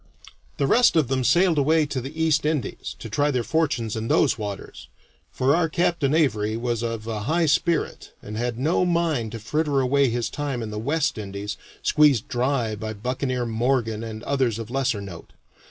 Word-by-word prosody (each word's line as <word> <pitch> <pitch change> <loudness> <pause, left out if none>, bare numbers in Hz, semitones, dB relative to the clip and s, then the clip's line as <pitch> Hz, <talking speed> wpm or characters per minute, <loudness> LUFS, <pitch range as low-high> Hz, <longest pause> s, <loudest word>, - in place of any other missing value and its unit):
The 140 - +1
rest 235 - +4
of 155 -6 +3
them 130 -1 0
sailed 175 +3 +4
away 155 +2 +3
to 135 -3 -3
the 135 +6 -8
East 155 -1 +2
Indies, 150 -7 -2
to - - -8
try 145 +7 +1
their 125 -4 0
fortunes 120 -4 0
in 110 0 -3
those - - +3
waters, 105 -3 -7 0.4
for 135 +3 +2
our 165 -1 +1
Captain 170 -4 +1
Avary 110 -8 +1
was 120 -1 -1
of 115 -2 -3
a 110 -2 -3
high 170 +1 +2
spirit, 165 +2 0
and 105 - -8
had 120 +1 -2
no 155 +8 +1
mind 165 -10 0
to - - -4
fritter 145 +5 0
away 135 +1 +3
his 120 0 -1
time 140 -5 -3
in 110 - -5
the 105 - -4
West 150 +2 0
Indies, 100 0 -5 0.3
squeezed 150 -7 +4
dry 120 -3 0
by 110 +1 -5
buccaneer 125 +3 -2
Morgan 115 -1 0
and 110 0 -7
others 130 -6 0
of 115 0 -7
lesser 130 -5 0
note. 95 -4 -10
130 Hz, 185 wpm, -24 LUFS, 110-150 Hz, 0.4 s, rest